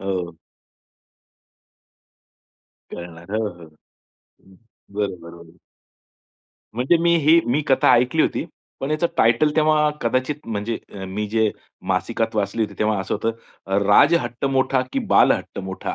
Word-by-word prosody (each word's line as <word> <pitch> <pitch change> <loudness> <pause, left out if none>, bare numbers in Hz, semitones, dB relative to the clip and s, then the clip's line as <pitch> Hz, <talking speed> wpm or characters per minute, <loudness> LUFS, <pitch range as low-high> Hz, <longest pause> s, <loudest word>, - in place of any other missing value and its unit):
हो. 90 -3 -3 2.5
कळणार. 85 +1 -10
हो, 110 - 0
हो. 85 -1 -14 0.6
हं. 95 -1 -25 0.4
बरोबर. 85 -4 -6 1.2
म्हणजे 130 +8 +2
मी 170 0 +4
ही, 160 +2 +5
मी 130 +6 +1
कथा 135 - +4
ऐकली 125 +6 +2
होती. - - -1 0.4
पण 135 +2 -3
याचं 155 +3 +1
टायटल 120 +7 +3
तेव्हा 155 -1 +3
कदाचित 130 +5 -2
म्हणजे 110 +1 -3 0.3
मी 105 +3 -3
जे 110 -1 +2 0.4
मासिकात 115 -1 -1
वाचली 105 +2 0
होती 105 - -3
तेव्हा 105 -1 +1
असं 95 - -3
होतं 110 -3 -4
राजहट्ट 130 +3 +3
मोठा 130 -1 +1
की - - 0
बालहट्ट - - +3
मोठा 95 - -5
115 Hz, 120 wpm, -22 LUFS, 95-135 Hz, 2.5 s, ही